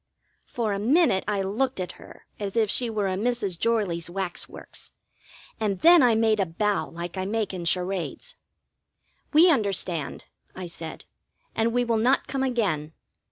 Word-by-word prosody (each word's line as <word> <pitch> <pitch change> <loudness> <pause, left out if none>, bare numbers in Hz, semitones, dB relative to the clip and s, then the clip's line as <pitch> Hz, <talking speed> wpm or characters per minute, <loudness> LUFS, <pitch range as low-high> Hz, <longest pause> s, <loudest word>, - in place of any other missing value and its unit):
For 225 -4 -1
a 195 - -2
minute 250 - +3
I 205 -2 0
looked 240 +5 -1
at 180 -1 -3
her - - -15
as 205 +1 -4
if 215 -3 +3
she 245 -2 +1
were 210 -3 -1
a 190 - -1
Mrs. 210 -3 -1
Jorley's 200 -8 0
wax 185 -1 -3
works, - - -8 0.7
and 205 -4 -1
then 345 -1 +8
I 240 -3 +5
made 220 -1 +3
a 195 - +3
bow 205 +5 0
like 170 +2 -6
I 185 - -2
make 215 0 -1
in 175 -2 -5
charades. 185 - -2 1.0
"We 335 +4 +7
understand," 195 - -1 0.3
I 185 - -6
said. 165 -2 -8 0.5
"And 225 +1 +1
we 245 +1 +1
will 230 -2 +1
not 255 +5 +3
come 270 - -3
again. 200 - 0
205 Hz, 165 wpm, -26 LUFS, 185-235 Hz, 1.0 s, then